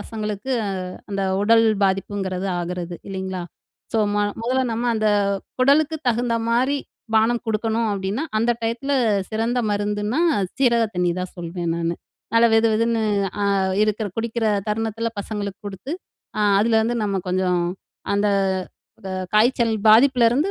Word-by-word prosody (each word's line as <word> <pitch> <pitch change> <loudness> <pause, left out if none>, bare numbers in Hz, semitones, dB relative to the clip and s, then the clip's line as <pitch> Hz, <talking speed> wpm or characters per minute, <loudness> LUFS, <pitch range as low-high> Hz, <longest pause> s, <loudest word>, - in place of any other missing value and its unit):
பசங்களுக்கு, 215 +2 -5 0.6
அந்த 200 -1 -1 0.2
உடல் 225 +2 +5 0.2
பாதிப்புங்கிறது 190 -1 -1
ஆகிறது, 175 0 -4
இல்லைங்களா? 190 -1 -4 0.5
ஸோ 225 - +1 0.2
ம - - 0 0.3
மொதல்ல 255 +3 +1
நம்ம 230 +2 -2
அந்த, 215 -1 0 0.5
குடலுக்கு 290 +4 +3
தகுந்த 240 0 +1
மாரி 255 +5 +2 0.4
பானம் 225 +2 +3
குடுக்கணும். 220 +1 0
அப்படீன்னா 200 +6 -2 0.2
அந்த 230 +2 +2
டயத்தில 235 +5 -2 0.4
சிறந்த 230 +3 0
மருந்துன்னா 205 +5 -1 0.4
சீரக 235 -3 +3
தண்ணி 180 -1 +1
தான் 180 0 -5
சொல்வேன் 170 -1 -3
நானு! 170 0 -1 0.4
நல்லா 230 0 +6
வெதுவெதுன்னு 225 0 +2 0.4
அ - - +2 0.4
இருக்கிற 215 0 0
குடிக்கிற 225 0 -1 0.2
தருணத்தில 225 +1 -1
பசங்களுக்கு 200 -1 -5
குடுத்து. 200 +8 -6 0.5
அ - - +1 0.2
அதுலருந்து 225 +2 +2
நம்ம 195 -2 -1
கொஞ்சம், 180 -1 +1 0.5
அந்த, 205 +1 +2 0.8
வ - - -4 0.3
காய்ச்சல் 235 0 +3
பாதிப்புலருந்து 250 - +5
220 Hz, 125 wpm, -22 LUFS, 195-235 Hz, 0.8 s, நல்லா